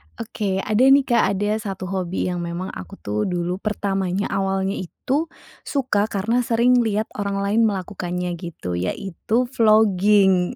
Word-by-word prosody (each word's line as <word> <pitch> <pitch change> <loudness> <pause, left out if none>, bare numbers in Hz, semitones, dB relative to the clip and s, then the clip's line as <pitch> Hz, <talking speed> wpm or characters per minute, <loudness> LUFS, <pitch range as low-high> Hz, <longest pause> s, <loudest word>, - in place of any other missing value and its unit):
Oke 205 -4 -3
ada 215 0 0
nih, 275 +1 +6
Kak, 240 -3 +2
ada 205 +2 0
1 195 -4 -5
hobi 185 -2 -2
yang 175 - -3
memang 175 +2 -4
aku 90 -1 -9
tuh 105 +4 -2
dulu 180 0 -2
pertamanya 195 -2 -2
awalnya 195 0 0
itu 275 - -2 0.4
suka 255 -7 0
karena 220 +4 0
sering 245 +1 +3
lihat 220 -2 0
orang 200 -1 -1
lain 205 +3 +2
melakukannya 180 -3 -3
gitu 125 - -5
yaitu 190 - -2
vlogging, 205 -3 +4
195 Hz, 140 wpm, -22 LUFS, 180-220 Hz, 0.4 s, nih